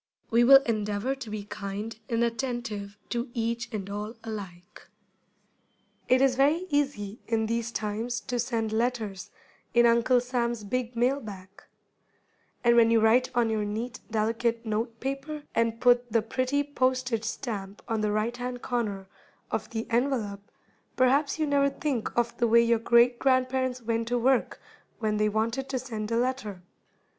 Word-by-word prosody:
We 235 Hz, +1 st, +5 dB
will 270 Hz, +2 st, +8 dB
endeavor 210 Hz, +1 st, -1 dB
to 265 Hz, -4 st, -8 dB
be 210 Hz, -1 st, -4 dB
kind 210 Hz, +2 st, -6 dB
and 230 Hz, 0 st, +1 dB
attentive 230 Hz, -4 st, -3 dB
to 240 Hz, +1 st, -2 dB
each 235 Hz, 0 st, -2 dB
and 200 Hz, -3 st, -4 dB
all 210 Hz, +3 st, -5 dB
alike. 190 Hz, -5 st, -8 dB, 1.2 s
It 255 Hz, +1 st, +5 dB
is 270 Hz, -1 st, +4 dB
very 295 Hz, +7 st, +3 dB
easy 270 Hz, -8 st, -1 dB
in 225 Hz, -1 st, +1 dB
these 230 Hz, +1 st, -2 dB
times 225 Hz, +3 st, -2 dB
to 245 Hz, -1 st, -3 dB
send 230 Hz, -3 st, -1 dB
letters 220 Hz, -5 st, -2 dB, 0.5 s
in 240 Hz, 0 st, +6 dB
Uncle 235 Hz, +2 st, +4 dB
Sam's 240 Hz, -2 st, -2 dB
big 245 Hz, +3 st, -3 dB
mail 250 Hz, +4 st, +2 dB
bag; 195 Hz, -6 st, -9 dB, 1.1 s
and 235 Hz, -1 st, +5 dB
when 230 Hz, -1 st, +6 dB
you 230 Hz, 0 st, +4 dB
write 230 Hz, +4 st, +4 dB
on 235 Hz, -2 st, +2 dB
your 215 Hz, -1 st, 0 dB
neat, 225 Hz, +4 st, -4 dB
delicate 230 Hz, +2 st, 0 dB
note 225 Hz, +1 st, -2 dB
paper, 275 Hz, +3 st, -4 dB
and 230 Hz, 0 st, +1 dB
put 245 Hz, -1 st, +3 dB
the 225 Hz, -1 st, +2 dB
pretty 255 Hz, +5 st, 0 dB
postage 255 Hz, -4 st, 0 dB
stamp 210 Hz, -4 st, -5 dB
on 225 Hz, -2 st, -1 dB
the 210 Hz, -1 st, +1 dB
right 215 Hz, +3 st, 0 dB
hand 245 Hz, 0 st, -5 dB
corner 210 Hz, -6 st, -2 dB, 0.5 s
of -, -, -2 dB
the 225 Hz, -1 st, -3 dB
envelope, 230 Hz, -5 st, 0 dB, 0.5 s
perhaps 275 Hz, +4 st, +3 dB
you 310 Hz, -, +1 dB
never 280 Hz, -1 st, +3 dB
think 275 Hz, -4 st, -2 dB
of 235 Hz, -1 st, +1 dB
the 240 Hz, -, +3 dB
way 235 Hz, +1 st, +6 dB
your 235 Hz, -1 st, +3 dB
great 235 Hz, +1 st, +4 dB
grandparents 255 Hz, -1 st, +1 dB
went 230 Hz, 0 st, -1 dB
to 245 Hz, +1 st, +1 dB
work 255 Hz, +1 st, +1 dB, 0.4 s
when 215 Hz, -2 st, -1 dB
they 210 Hz, 0 st, +2 dB
wanted 230 Hz, +5 st, -1 dB
to 265 Hz, -, -1 dB
send 225 Hz, -4 st, -5 dB
a 230 Hz, -, 0 dB
letter. 235 Hz, -7 st, -2 dB
235 Hz, 160 wpm, -27 LUFS, 220-255 Hz, 1.2 s, will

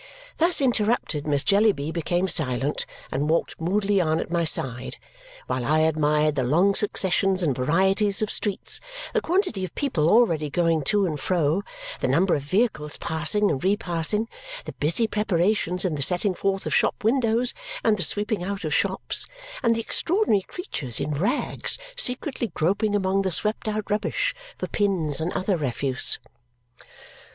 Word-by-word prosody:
Thus 335 Hz, -1 st, +2 dB
interrupted, 220 Hz, -, 0 dB
Miss 145 Hz, -1 st, +1 dB
Jellyby 200 Hz, -7 st, +2 dB
became 175 Hz, +2 st, -1 dB
silent 140 Hz, -4 st, 0 dB, 0.2 s
and 145 Hz, +3 st, -1 dB
walked 165 Hz, 0 st, -1 dB
moodily 195 Hz, +3 st, +1 dB
on 160 Hz, -1 st, +1 dB
at -, -, -5 dB
my 170 Hz, -1 st, +1 dB
side 130 Hz, -5 st, -1 dB, 0.5 s
while 130 Hz, -, -2 dB
I 155 Hz, +5 st, +2 dB
admired 150 Hz, -1 st, +2 dB
the 135 Hz, -2 st, -1 dB
long 170 Hz, +10 st, +3 dB
successions 190 Hz, -2 st, +1 dB
and 145 Hz, -6 st, +1 dB
varieties 195 Hz, -, +2 dB
of 215 Hz, -, -2 dB
streets, 205 Hz, -3 st, -3 dB, 0.3 s
the 455 Hz, -, +1 dB
quantity 355 Hz, -, 0 dB
of 185 Hz, -, -6 dB
people 175 Hz, -, +1 dB
already 170 Hz, -10 st, +3 dB
going 165 Hz, 0 st, +1 dB
to 205 Hz, +3 st, +3 dB
and 155 Hz, -5 st, -3 dB
fro, 165 Hz, +2 st, +1 dB, 0.4 s
the -, -, 0 dB
number 180 Hz, +1 st, +2 dB
of 145 Hz, -, 0 dB
vehicles 155 Hz, -, -1 dB
passing 165 Hz, +6 st, +1 dB
and 140 Hz, 0 st, -3 dB
repassing, 195 Hz, +2 st, 0 dB, 0.4 s
the -, -, -7 dB
busy 165 Hz, +10 st, +1 dB
preparations 195 Hz, -3 st, 0 dB
in 180 Hz, -, 0 dB
the 145 Hz, -, -3 dB
setting 180 Hz, +6 st, +3 dB
forth 195 Hz, +1 st, -2 dB
of -, -, -2 dB
shop -, -, +1 dB
windows 235 Hz, +1 st, +2 dB, 0.3 s
and 220 Hz, -2 st, +3 dB
the 195 Hz, -, -4 dB
sweeping 205 Hz, +3 st, +2 dB
out 195 Hz, +1 st, -4 dB
of 155 Hz, -, -2 dB
shops, -, -, +1 dB, 0.3 s
and 230 Hz, -4 st, +2 dB
the 230 Hz, -, -1 dB
extraordinary 335 Hz, -, +2 dB
creatures 155 Hz, -, -5 dB
in 150 Hz, -, -2 dB
rags 195 Hz, -, 0 dB, 0.2 s
secretly 255 Hz, -, +1 dB
groping 205 Hz, +6 st, +1 dB
among 195 Hz, -1 st, +1 dB
the 190 Hz, -, -1 dB
swept 210 Hz, +5 st, 0 dB
out 215 Hz, -1 st, -2 dB
rubbish 225 Hz, -, 0 dB, 0.2 s
for -, -, -3 dB
pins 170 Hz, -8 st, 0 dB
and 165 Hz, +3 st, -1 dB
other 190 Hz, 0 st, 0 dB
refuse. 135 Hz, -2 st, 0 dB
185 Hz, 160 wpm, -24 LUFS, 155-210 Hz, 0.5 s, long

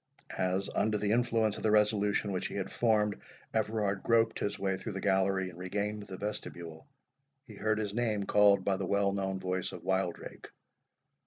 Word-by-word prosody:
As, 95 Hz, +1 st, +1 dB
under 105 Hz, -1 st, +2 dB
the 105 Hz, 0 st, 0 dB
influence 115 Hz, -2 st, +2 dB
of -, -, -7 dB
the 110 Hz, -, +1 dB
resolution 105 Hz, -1 st, +2 dB
which 90 Hz, -, -2 dB
he -, -, -8 dB
had 95 Hz, -1 st, -3 dB
formed, 105 Hz, -3 st, +1 dB, 0.3 s
Everard 105 Hz, -3 st, 0 dB
groped 115 Hz, -1 st, +2 dB
his 100 Hz, 0 st, -2 dB
way 95 Hz, -1 st, 0 dB
through 100 Hz, +3 st, -6 dB
the 95 Hz, -, -4 dB
gallery 95 Hz, -1 st, +1 dB
and 90 Hz, -, -14 dB
regained 105 Hz, +3 st, -3 dB
the 95 Hz, -1 st, -7 dB
vestibule, 85 Hz, -, -6 dB, 0.6 s
he 110 Hz, -, -12 dB
heard 110 Hz, +1 st, 0 dB
his 105 Hz, -2 st, -2 dB
name 110 Hz, -3 st, 0 dB
called 100 Hz, -1 st, +4 dB
by 95 Hz, -1 st, +1 dB
the 95 Hz, -, -3 dB
well 100 Hz, 0 st, +2 dB
known 95 Hz, -1 st, -2 dB
voice 90 Hz, 0 st, -2 dB
of -, -, -9 dB
Wildrake. 95 Hz, -2 st, -2 dB
100 Hz, 180 wpm, -31 LUFS, 95-105 Hz, 0.6 s, called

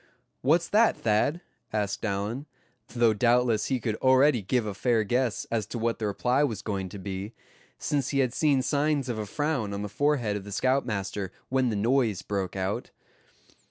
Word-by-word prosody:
"What's 165 Hz, +6 st, +3 dB
that, 220 Hz, +2 st, +4 dB
Thad?" 115 Hz, +10 st, +1 dB, 0.3 s
asked 105 Hz, -2 st, -2 dB
Allan, 110 Hz, +7 st, -2 dB, 0.4 s
though 120 Hz, -2 st, +2 dB
doubtless 120 Hz, 0 st, +2 dB
he 130 Hz, -2 st, 0 dB
could 115 Hz, -2 st, -1 dB
already 130 Hz, -1 st, +4 dB
give 115 Hz, +4 st, 0 dB
a 105 Hz, -, -3 dB
fair 115 Hz, +2 st, +1 dB
guess 120 Hz, +1 st, 0 dB
as 110 Hz, -3 st, -1 dB
to 120 Hz, -, -5 dB
what 115 Hz, 0 st, -1 dB
the 110 Hz, -, -1 dB
reply 125 Hz, +7 st, +1 dB
was 115 Hz, -7 st, -2 dB
going 95 Hz, -3 st, -3 dB
to 100 Hz, -, -8 dB
be, 100 Hz, +3 st, -5 dB, 0.4 s
since 140 Hz, -3 st, -1 dB
he 140 Hz, -, -1 dB
had 130 Hz, -3 st, +2 dB
seen 140 Hz, -2 st, +2 dB
signs 145 Hz, -1 st, +1 dB
of 115 Hz, -3 st, -2 dB
a 105 Hz, -, -4 dB
frown 130 Hz, -5 st, -1 dB
on 100 Hz, -, -4 dB
the -, -, -3 dB
forehead 120 Hz, -2 st, +1 dB
of 100 Hz, -, -4 dB
the 100 Hz, -, -9 dB
scoutmaster 105 Hz, -6 st, -1 dB, 0.2 s
when 130 Hz, -1 st, +2 dB
the 110 Hz, -, -1 dB
noise 115 Hz, -2 st, +1 dB
broke 95 Hz, -3 st, -3 dB
out. 95 Hz, +1 st, -2 dB
115 Hz, 185 wpm, -27 LUFS, 105-130 Hz, 0.4 s, that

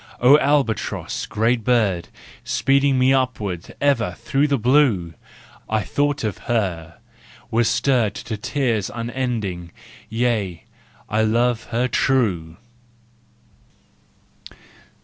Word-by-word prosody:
Oh 135 Hz, +5 st, +6 dB
albatross, 140 Hz, -7 st, -1 dB
great 115 Hz, +2 st, 0 dB
bird, 105 Hz, -8 st, +1 dB, 0.4 s
Speeding 140 Hz, 0 st, +2 dB
me 130 Hz, +1 st, +4 dB
upward 110 Hz, -9 st, -2 dB
ever 120 Hz, -11 st, +1 dB
through 140 Hz, +2 st, 0 dB
the 140 Hz, -1 st, +1 dB
blue! 120 Hz, -, +2 dB, 0.6 s
I 110 Hz, -1 st, 0 dB
thought 145 Hz, -2 st, -1 dB
of 105 Hz, -3 st, -3 dB
her, 90 Hz, -8 st, -1 dB, 0.5 s
was 115 Hz, 0 st, +2 dB
stirred 120 Hz, -3 st, +1 dB
To 110 Hz, -, -5 dB
tears 115 Hz, -2 st, -1 dB
unending—yea, 115 Hz, -3 st, -3 dB, 0.4 s
I 105 Hz, +1 st, 0 dB
love 115 Hz, +2 st, +1 dB
her 120 Hz, +2 st, -1 dB
true! 95 Hz, -13 st, 0 dB
115 Hz, 95 wpm, -21 LUFS, 105-130 Hz, 0.6 s, Oh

